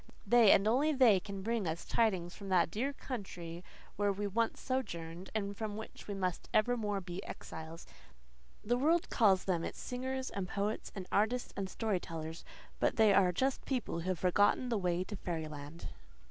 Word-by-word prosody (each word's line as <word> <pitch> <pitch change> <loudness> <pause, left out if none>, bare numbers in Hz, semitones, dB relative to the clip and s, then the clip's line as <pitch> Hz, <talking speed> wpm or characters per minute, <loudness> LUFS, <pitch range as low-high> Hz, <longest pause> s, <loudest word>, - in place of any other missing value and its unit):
They, 230 0 +6
and 195 - +5
only 280 +7 +3
they, 245 -8 +6
can 195 0 -7
bring 225 -3 0
us 160 +1 -3
tidings 185 -7 +1
from 200 -2 -8
that 175 -3 +3
dear 255 +7 -1
country 180 -11 -6 0.3
where 205 0 +2
we 205 +1 -3
once 225 +3 0
sojourned 175 -9 -4
and 200 -2 -1
from 210 -1 -4
which 220 - -9
we 205 - -3
must 185 -3 -2
evermore 215 -2 +2
be 180 +1 -6
exiles. 160 +1 -8 0.8
The 240 +3 +1
world 325 +5 +2
calls 195 -6 +4
them 175 -3 0
its - - -5
singers 260 +1 -3
and 190 -2 -4
poets 205 +3 -2
and 190 -2 -5
artists 225 +5 +1
and 195 -1 -3
story 210 -2 -1
tellers; 160 -1 -6 0.4
but - - +2
they 220 -2 +6
are 185 -2 +5
just 260 +9 0
people 250 -10 -2
who 175 +3 -3
have 185 - 0
never - - -17
forgotten 205 +6 +3
the 230 -3 +1
way 180 -1 0
to 210 - -7
fairyland. 155 -2 -5
200 Hz, 185 wpm, -34 LUFS, 180-230 Hz, 0.8 s, They